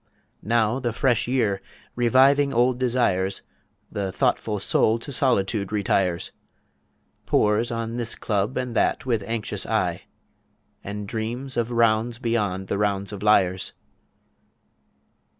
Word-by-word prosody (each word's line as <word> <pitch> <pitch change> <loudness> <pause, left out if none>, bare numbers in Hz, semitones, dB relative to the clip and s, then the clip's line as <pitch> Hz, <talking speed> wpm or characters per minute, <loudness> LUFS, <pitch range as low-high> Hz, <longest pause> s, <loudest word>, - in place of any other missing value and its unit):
Now 115 +2 +1
the 120 -3 -2
fresh 125 -1 +1
Year, 110 -6 0 0.3
reviving 135 +4 +4
old 125 +1 +2
Desires, 115 -7 +1 0.5
The 100 -3 -3
thoughtful 105 +3 0
Soul 110 +3 +2
to 115 +5 -7
Solitude 105 -7 +1
retires, 95 -4 0 1.0
Pores 110 +3 +2
on 115 0 -3
this 115 -2 -2
Club 105 +3 -1
and 125 -2 -3
That 155 - +1
with 115 -5 0
anxious 115 +1 -2
eye, - - -1 0.8
And 105 0 -5
dreams 120 +5 -4
of 120 -1 0
Rounds 115 0 +2
beyond 105 -6 -1
the 100 - -2
Rounds 100 -1 -1
of 100 - -7
Liars. 95 -3 +2
115 Hz, 120 wpm, -24 LUFS, 100-120 Hz, 1.0 s, reviving